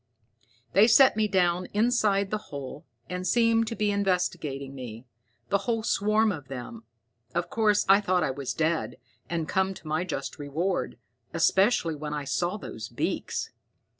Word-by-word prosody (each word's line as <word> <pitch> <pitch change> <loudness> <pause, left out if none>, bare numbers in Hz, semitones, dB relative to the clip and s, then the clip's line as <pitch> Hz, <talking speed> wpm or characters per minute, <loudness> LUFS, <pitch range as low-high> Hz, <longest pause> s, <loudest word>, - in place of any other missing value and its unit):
"They 200 +5 +6
set 260 +2 +6
me 215 -1 +2
down 180 -2 +1
inside 210 -3 +2
the 215 - 0
hole 140 -1 -7 0.2
and 180 0 -4
seemed 230 -1 +3
to 230 - -3
be 210 -2 +1
investigating 175 -8 -1
me, 125 -3 -8 0.4
the 200 - +2
whole 225 -1 0
swarm 215 0 +2
of 145 -8 -7
them. 120 -3 -8 0.5
Of - - -1
course, 215 -5 +2
I 195 +2 +6
thought 185 -3 +1
I 140 - 0
was 135 -1 -4
dead, 160 +1 -1 0.3
and 165 -2 -2
come 190 0 0
to 160 - -12
my 155 +3 0
just 185 - -5
reward, 160 +5 -2 0.4
especially 175 +2 +3
when 150 0 -5
I 145 - -3
saw 175 +7 -1
those 110 - -7
beaks. - - -3
180 Hz, 160 wpm, -27 LUFS, 150-210 Hz, 0.5 s, They